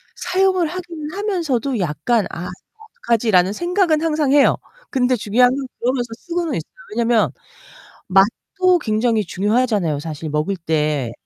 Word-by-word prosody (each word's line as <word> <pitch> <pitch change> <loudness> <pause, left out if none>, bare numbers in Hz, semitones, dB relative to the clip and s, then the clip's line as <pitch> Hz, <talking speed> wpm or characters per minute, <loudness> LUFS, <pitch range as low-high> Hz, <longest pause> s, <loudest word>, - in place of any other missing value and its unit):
사용을 370 -1 +1
하긴 335 -3 -6
하면서도 315 - -1
약간 180 +7 0
'아 170 - -7
이거 - - -5 0.5
어떡하지?' 230 - +1
라는 185 +2 +4
생각은 345 - +1
항상 305 -4 +1
해요. 285 -1 +5 0.3
근데 255 -1 +2
중요한 245 +4 +3
건 275 -2 -4
그러면서 245 0 0
쓰고는 340 -2 -3
있어요. 160 - -6 0.2
왜냐하면 225 - +2 0.8
맛도 350 - +3
굉장히 220 -1 +1
중요하잖아요, 205 - 0
사실 155 0 -6
먹을 155 +6 -1
때. 150 -6 -1
240 Hz, 335 characters per minute, -20 LUFS, 195-315 Hz, 0.8 s, 해요